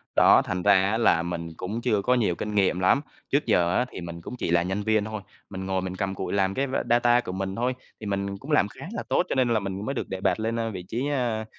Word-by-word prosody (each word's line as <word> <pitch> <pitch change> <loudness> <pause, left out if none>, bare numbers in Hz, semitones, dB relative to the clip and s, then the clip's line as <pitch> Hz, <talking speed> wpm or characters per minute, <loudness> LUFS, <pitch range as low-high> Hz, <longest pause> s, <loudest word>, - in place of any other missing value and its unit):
Đó, - - +7
thành 90 -1 -3
ra 100 - +6 0.2
á 110 - +1
là 110 -7 +3
mình 85 -1 -4
cũng 110 +6 -4
chưa 105 -3 +1
có 125 +6 +2
nhiều 105 -8 +1
kinh 105 +4 -4
nghiệm 95 -3 +2
lắm. 95 +9 +3 0.3
Trước 145 +2 +1
giờ 85 0 +2
á, 125 - +2
thì - - -7
mình 85 0 -7
cũng 125 - -7
chỉ 85 - -2
là 85 0 +3
nhân 95 +3 -2
viên 110 -1 +2
thôi, 110 -2 -5 0.3
mình 95 -1 -6
ngồi 95 -1 -1
mình 95 0 -4
cặm 95 0 -2
cụi 95 - -4
làm 95 -1 +1
cái 135 +4 -1 0.2
data 120 0 +4
của 90 - -6
mình 95 +1 -3
thôi, 125 +3 0 0.3
thì 110 - -8
mình 100 -1 -2
cũng 140 +9 -8
làm 125 -8 +4
khá - - -11
là - - -3
tốt, - - +2
cho - - -1
nên 130 -2 +2
là 115 -2 +2
mình 100 +1 -4
mới 135 - -2
được - - -3
đề 95 - -4
bạt - - +1
lên, 115 +1 -1
ơ, 115 -1 -1
vị 95 -3 -6
trí, 125 +5 -2
a, 120 -5 -1
100 Hz, 285 wpm, -26 LUFS, 95-115 Hz, 0.3 s, Đó